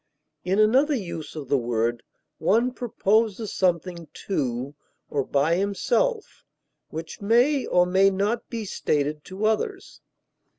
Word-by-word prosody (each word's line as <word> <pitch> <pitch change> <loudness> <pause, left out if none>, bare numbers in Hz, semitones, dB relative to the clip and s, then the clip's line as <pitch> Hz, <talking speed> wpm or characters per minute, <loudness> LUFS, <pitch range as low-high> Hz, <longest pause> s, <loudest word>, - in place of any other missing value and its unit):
In 185 +2 0
another 260 +8 +4
use 170 - -6
of 150 -4 -6
the 140 0 +2
word, 120 0 -1 0.4
one 235 +5 +2
proposes 220 -3 0
something 175 -2 -1 0.2
to 135 -6 -2 0.4
or 140 -2 0
by 145 +6 +1
himself 430 - -1 0.5
which 160 +4 -7
may 245 +7 +3
or 180 0 +4
may 190 +2 +4
not 205 +5 -1
be 225 -2 -4
stated 150 -4 -1
to 195 +3 -4
others. 380 - -2
190 Hz, 125 wpm, -25 LUFS, 155-230 Hz, 0.5 s, another